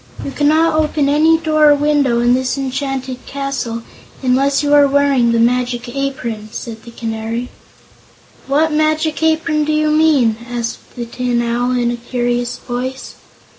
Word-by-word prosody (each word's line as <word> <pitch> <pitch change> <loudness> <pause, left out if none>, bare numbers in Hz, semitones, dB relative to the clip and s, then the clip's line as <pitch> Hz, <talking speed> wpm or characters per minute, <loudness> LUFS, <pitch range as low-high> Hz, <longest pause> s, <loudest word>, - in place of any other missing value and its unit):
"You - - -4
cannot 310 +3 +2
open 300 -2 +1
any 310 +3 +4
door 310 -2 +3
or 290 - +6
window 285 -5 +2
in 240 +1 +3
this 260 +1 0
enchanted 265 -1 -4
castle 270 -5 -4 0.4
unless 275 +3 +2
you 290 0 +1
are 290 -1 +6
wearing 275 -4 +2
the 230 - +2
Magic 245 +1 +1
Apron," 240 -6 -4
said 225 -1 -7
the 235 - -12
Canary. 230 +1 -4 1.0
"What 305 +4 +2
Magic 310 +1 0
Apron 315 -1 +1
do 305 - -1
you 305 0 +1
mean?" 300 -8 +3
asked 235 -1 -5
the 240 -2 -4
Tin 240 0 -1
Owl, 240 +2 0
in 240 -1 +1
a 240 - -4
curious 245 0 -2
voice. 255 +2 -5
265 Hz, 155 wpm, -17 LUFS, 240-295 Hz, 1.0 s, or